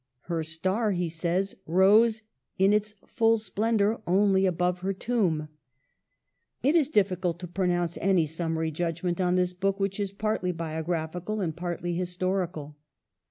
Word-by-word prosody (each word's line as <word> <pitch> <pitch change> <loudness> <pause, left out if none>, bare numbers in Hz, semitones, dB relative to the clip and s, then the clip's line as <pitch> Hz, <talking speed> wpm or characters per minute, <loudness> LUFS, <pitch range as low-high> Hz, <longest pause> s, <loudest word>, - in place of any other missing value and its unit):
"Her 170 -2 -3
star," 185 +7 -1
he 175 -2 -1
says, 175 +4 -1
"rose 215 +6 +4 0.3
in 195 +1 +4
its 210 0 0
full 225 -2 +2
splendor 220 0 0
only 190 +1 +3
above 180 0 0
her 195 +2 -2
tomb." 185 -8 0 1.2
It 285 +5 +3
is 300 -5 +3
difficult 185 - +1
to 180 - -5
pronounce 175 -1 -1
any 185 -3 +3
summary 160 0 -2
judgment 175 +3 -2
on 180 0 +2
this 180 0 +1
book, 195 +2 -1
which 195 +1 -1
is 200 -2 -1
partly 205 -2 -1
biographical 165 +4 -3
and 165 -5 -2
partly 175 0 -3
historical. 180 -4 -2
180 Hz, 140 wpm, -27 LUFS, 170-200 Hz, 1.2 s, rose